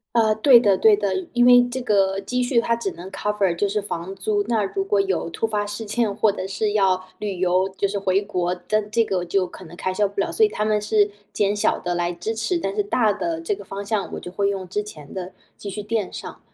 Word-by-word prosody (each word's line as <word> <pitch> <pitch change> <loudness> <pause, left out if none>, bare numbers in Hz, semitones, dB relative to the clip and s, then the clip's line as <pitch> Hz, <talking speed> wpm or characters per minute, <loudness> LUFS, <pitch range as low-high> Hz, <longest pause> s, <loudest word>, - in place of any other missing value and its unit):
呃， 220 -2 +4
对 240 +3 +7
的 205 -4 +3
对 215 +2 +5
的。 205 0 -1 0.3
因 245 0 +4
为 245 0 +8
这 255 +1 -4
个 195 -4 +2
积 250 +5 -1
蓄 245 -1 +2
它 230 0 +1
只 230 -4 -3
能 175 +3 -9
cover 205 -4 0
就 200 +4 0
是 210 +2 0
房 190 -2 -5
租， 205 +1 0
那 225 -3 +1
如 390 - -2
果 415 +1 +2
有 390 - -1
突 195 - -1
发 210 -2 -1
事 210 +2 -5
件， 215 0 0
或 215 0 +2
者 185 - -5
是 205 +2 -1
要 190 -3 +2
旅 205 -3 -3
游， 185 +1 +2
就 200 - +2
是 200 - -3
回 190 0 +1
国， 180 -3 -1 0.2
但 215 -1 0
这 230 +1 +3
个 185 -4 -1
就 185 +1 +1
可 180 +1 -12
能 170 0 -12
开 185 +1 -2
销 205 +1 +2
不 200 0 -4
了。 - - -1
所 445 - +4
以 425 - +4
他 210 - -2
们 215 -1 +1
是 210 -1 +3 0.2
减 205 0 +1
小 210 - +1
地 175 0 -2
来 175 0 -1
支 175 +6 -4
持， 225 +11 -1
但 195 -11 -3
是 210 - +1
大 210 +1 +2
的 330 - -3
这 335 +5 -1
个 400 - -11
方 200 +1 -6
向 200 -1 -2
我 - - -4
就 175 - -8
会 200 +1 +1
用 190 -2 -3
之 205 +4 -1
前 155 -9 -11
的 185 -1 -5 0.2
积 200 - -7
蓄 210 - -5
垫 210 -1 -2
上。 - - -8
205 Hz, 295 characters per minute, -23 LUFS, 190-225 Hz, 0.3 s, 为